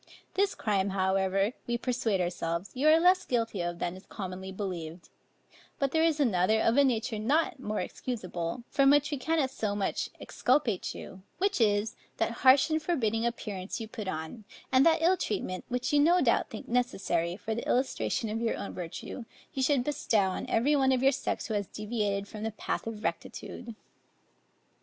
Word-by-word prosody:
This 395 +1 +1
crime, 200 -2 0
however, 190 +2 +1
we 240 0 0
persuade 235 -5 0
ourselves, 175 +1 -2
you 270 +4 +1
are 315 +1 +7
less 365 +2 +5
guilty 230 -6 -1
of, 175 0 -3
than 175 +1 -2
is 190 - -14
commonly 190 -1 -6
believed: 180 -4 -5 0.7
but 275 -1 0
there 320 - +2
is 325 -2 +2
another 220 -4 +3
of 225 +1 +3
a 285 - +6
nature 230 -4 0
not 295 +7 +1
more 215 -4 -2
excusable, 185 -3 -4
from 275 -1 +4
which 290 +1 +4
we 290 - -1
cannot 290 0 0
so 215 -6 -2
much 200 -2 -1
exculpate 250 -7 0
you; 190 - -9 0.2
which 395 -6 +1
is, 210 0 +2 0.2
that - - +1
harsh 265 +4 +6
and 315 0 +1
forbidding 235 -9 0
appearance 205 -5 -4
you 225 - -5
put 215 -2 -7
on, 160 +6 -5 0.3
and 260 +1 +6
that 325 0 +3
ill 365 +3 +4
treatment, 185 - -3
which 250 +3 -1
you 290 - +5
no 340 +5 +5
doubt 245 -8 +2
think 215 - -8
necessary, 190 -8 0
for 220 +1 -3
the 230 - -4
illustration 250 -2 0
of 220 +2 -3
your 230 - 0
own - - -5
virtue, 180 +7 -6 0.3
you 270 - -2
should 265 -1 +3
bestow 220 -8 +1
on 185 - -4
every 280 +7 +2
one 265 -2 +3
of 260 0 +1
your 270 - +6
sex - - -2
who 220 - -3
has 205 -2 -1
deviated 205 -2 -2
from 215 0 -8
the 220 - -1
path 220 - -4
of 220 -2 -6
rectitude. 235 -2 -5
225 Hz, 185 wpm, -29 LUFS, 195-270 Hz, 0.7 s, are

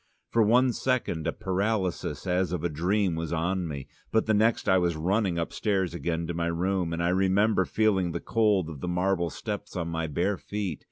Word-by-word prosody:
For 115 - +3
one 120 +4 +4
second 115 -13 -1
a - - +2
paralysis 100 -1 -2
as 90 -1 +1
of 90 -3 -2
a 85 - +1
dream 90 +5 +1
was 80 0 -3
on 90 +2 0
me, 70 -4 -6 0.2
but 110 - +2
the 110 - +2
next 110 +2 +2
I 95 - +5
was 85 -2 +1
running 95 +3 0
upstairs 95 +1 -1
again 85 -1 -2
to 85 - -3
my 85 0 -1
room, 90 +1 0
and 85 +1 -2
I 85 - +2
remember 95 +2 +3
feeling 95 -3 +1
the - - -3
cold 105 -6 +2
of 80 -4 -8
the - - -3
marble 90 -1 +1
steps 105 +1 -6
on 85 -2 -2
my 80 0 -2
bare 90 +7 0
feet. 100 -6 -4
90 Hz, 205 wpm, -27 LUFS, 85-105 Hz, 0.2 s, I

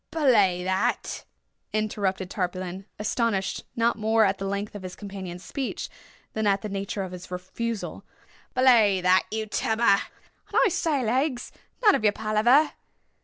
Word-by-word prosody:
'" - - -52
"Belay 215 - +3
that!" 185 +1 -1 0.5
interrupted 200 -3 -1
Tarpaulin, 185 0 -4
astonished 210 -2 -1
not 230 -1 +1
more 220 0 +3
at 195 0 0
the 195 - -3
length 200 +1 -3
of 205 - -7
his 185 -1 -7
companion's 190 -3 -7
speech 265 +7 -4 0.4
than 220 -1 0
at 200 +1 +2
the 215 - -3
nature 195 0 -3
of 185 - -6
his 180 0 -9
refusal—"Belay 215 +2 0
that 185 +1 +4
you 220 0 -2 0.2
lubber!—and 210 -4 0
I 475 - +5
say, 300 -7 0
Legs, 255 +2 0 0.3
none 415 -3 +7
of - - 0
your 210 -1 +4
palaver! 235 +9 +3
205 Hz, 145 wpm, -26 LUFS, 190-230 Hz, 0.5 s, none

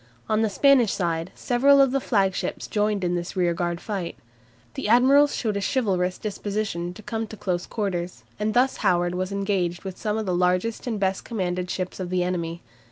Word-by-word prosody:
On 215 0 +2
the 220 - +2
Spanish 245 +1 +4
side 170 -1 -2
several 275 +3 +4
of 270 -2 +5
the 275 - +1
flagships 195 -7 0
joined 210 -2 0
in 175 0 0
this 175 0 -3
rearguard 175 -1 0
fight. 195 -5 -4 0.6
The - - -4
admirals 270 +6 +5
showed 215 -4 -1
a - - -2
chivalrous 190 -6 0
disposition 205 -4 -3
to 215 - -12
come 225 +1 -3
to 215 - -10
close 180 -3 -2
quarters, 180 -5 -3 0.2
and 215 0 -1
thus 255 +2 +3
Howard 175 -1 +1
was 185 +1 -2
engaged 195 -3 -1
with 190 -2 -7
some 215 -1 -1
of 220 - -2
the 185 - -1
largest 180 +7 0
and 225 -4 -2
best 190 -1 0
commanded 180 -5 -2
ships 185 0 -4
of 185 -2 -4
the 180 -1 +1
enemy. 170 -2 -3
195 Hz, 190 wpm, -25 LUFS, 180-220 Hz, 0.6 s, of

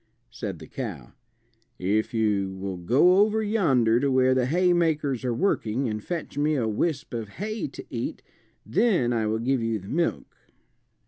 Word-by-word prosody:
Said 105 -6 -5
the 80 - -11
cow, 90 - -7 0.6
"If 105 +6 0
you 105 -4 0
will 95 -1 -4
go 140 - +4
over 215 +1 +3
yonder 135 - +3
to 140 +2 +1
where 130 0 +4
the 130 -1 +1
haymakers 160 -5 +1
are 125 - 0
working 125 - 0
and 105 -1 -4
fetch 170 -4 -4
me 150 +1 +2
a 120 -5 0
wisp 140 +7 -2
of 115 -3 -4
hay 215 +2 -3
to - - -10
eat, - - -4 0.4
then 175 - +2
I 110 -2 0
will 110 +1 0
give 125 +2 0
you 115 -1 0
the 95 -1 -10
milk." 170 +2 -1
125 Hz, 170 wpm, -26 LUFS, 110-165 Hz, 0.6 s, go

